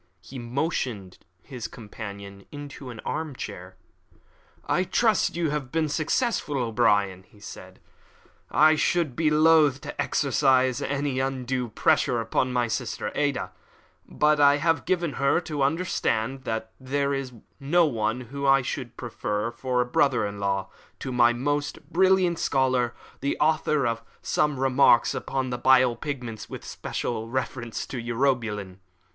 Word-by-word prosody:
He 130 +9 -9
motioned 120 - -3 0.2
his 125 -4 -6
companion 100 -3 -9
into 145 -2 -8
an 115 -2 -8
arm 155 -4 -4
chair. - - -8 0.9
"I 185 - +1
trust 220 +2 +2
that - - -8
you 165 -4 0
have 145 -4 -3
been 160 -1 0
successful, 155 - 0
O'Brien," 105 -6 +1 0.2
said 100 - -10
he. - - -34 0.6
"I 155 +1 +5
should 155 -4 +1
be 160 -1 +2
loath 155 -3 +5
to - - -4
exercise 130 -2 +2
any 140 -2 -1
undue 130 -2 -2
pressure 120 +2 +2
upon 115 +3 0
my 125 -1 +1
sister 110 -2 -3
Ada; 145 -2 -1 0.6
but 150 0 +2
I 145 0 +6
have 165 +2 +1
given 170 -5 0
her 140 +4 +3
to 155 -4 -4
understand 135 -5 0
that 110 0 -3
there 140 +2 -1
is 135 -2 -4 0.3
no 165 +5 +3
one 115 -3 -1
whom 140 +3 -4
I 135 -1 +5
should 125 -1 -5
prefer 105 -2 -3
for 125 +1 -1
a - - 0
brother 125 -1 +2
in 100 0 -5
law 100 -1 -1 0.3
to 130 - -4
my 120 -1 +5
most 145 +4 -3
brilliant 185 -1 +3
scholar, 130 -3 +1 0.2
the 140 - -1
author 155 -2 +2
of 115 -1 -1 0.2
Some 150 -3 0
Remarks 135 -2 +4
upon 130 -2 -3
the 125 - -3
Bile 130 -2 +5
Pigments, 120 -5 -6
with - - -8
special 115 -1 -4
reference 120 -2 -3
to 125 - -5
Urobilin." 115 -6 -1
130 Hz, 145 wpm, -26 LUFS, 120-145 Hz, 0.9 s, I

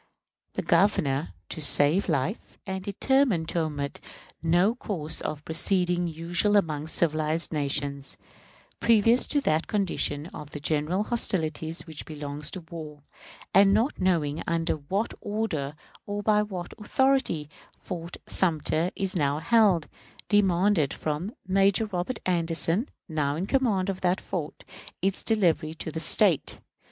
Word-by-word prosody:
The - - -3
Governor, 150 -8 +2
to 160 - -3
save 150 +6 +4
life, 155 - -2
and 190 -1 -4
determined 205 - +1
to 170 - 0
omit 145 -3 -3 0.4
no 175 +6 +3
course 165 -10 -4
of 150 -1 -5
proceeding 175 +1 +1
usual 170 +5 +1
among 155 -5 0
civilized 160 0 0
nations, 140 -1 -2 0.6
previous 230 +2 +4
to 290 - +2
that 155 - +1
condition 175 -8 0
of 150 0 -7
general 155 +6 0
hostilities 165 -8 -1
which 160 -3 -8
belongs 150 -1 -4
to 185 - -7
war, 155 -3 -9 0.5
and 195 +1 +6
not 235 +7 +1
knowing 165 -5 +1
under 165 0 +1
what 190 +9 -2
order, 180 -10 -2 0.3
or 205 0 -3
by 210 -1 +4
what 185 -4 -5
authority, 265 - +1 0.3
Fort 170 -2 -7
Sumter 165 -1 +1
is 195 -1 -2
now 145 -3 +1
held, 195 -2 +3 0.4
demanded 190 -6 +3
from 155 +6 -3
Major 195 +3 +3
Robert 205 +4 -3
Anderson, 170 - 0 0.2
now 150 -3 -1
in 175 +5 -2
command 210 -6 +1
of 195 -1 -3
that 180 0 +1
fort, 165 -6 -5 0.4
its 195 0 +1
delivery 170 -7 +1
to 160 - -5
the 160 - -4
State. 170 0 +2
170 Hz, 130 wpm, -27 LUFS, 155-200 Hz, 0.6 s, and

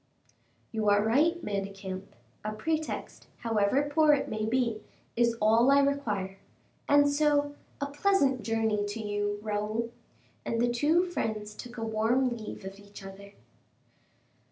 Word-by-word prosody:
"You 220 -2 +1
are 205 0 +4
right, 305 +10 +3
Manicamp; 195 -1 -5 0.3
a 215 0 -3
pretext, 315 +8 -3
however 225 +3 +2
poor 310 -1 +6
it 290 - 0
may 215 0 -2
be, 235 -2 0 0.3
is 235 -1 +2
all 225 +4 +4
I 280 0 +6
require. 210 -9 -1 0.5
And 285 0 +6
so, 290 0 +2 0.3
a 280 - -1
pleasant 285 -3 +2
journey 220 -2 0
to 205 +2 -4
you, 205 -1 -2
Raoul!" 215 +2 -2 0.5
And 230 - -2
the 240 +1 +2
two 300 +8 +3
friends 215 -12 -3
took 245 +3 -10
a 225 - -3
warm 235 +3 +1
leave 215 -3 -8
of 195 +1 -8
each 205 -1 -12
other. 200 +1 -11
225 Hz, 140 wpm, -29 LUFS, 205-280 Hz, 0.5 s, poor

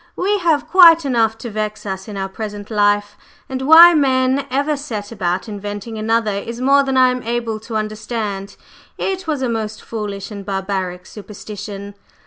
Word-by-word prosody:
We 405 +3 0
have 310 -4 +1
quite 335 -2 +7
enough 225 -4 +1
to 235 -1 -7
vex 215 0 -4
us 190 -1 -5
in 205 -2 -7
our 195 0 -2
present 205 +1 -7
life, 205 0 +1 0.3
and 260 0 -4
why 325 +5 +9
men 265 -2 +2
ever 285 +4 0
set 225 -8 -6
about 185 -2 -2
inventing 205 +1 -6
another 225 0 +1
is 230 +4 -6
more 275 +2 +4
than 270 -1 -1
I 255 -1 +5
am 250 0 -3
able 230 -2 -3
to 225 +1 -8
understand. 215 -2 -4 0.4
It 380 -2 -3
was 295 -4 -1
a - - +1
most 220 -2 -4
foolish 210 -2 -6
and 200 -1 -7
barbaric 190 -2 -3
superstition." 205 -1 -9
220 Hz, 170 wpm, -19 LUFS, 205-265 Hz, 0.4 s, why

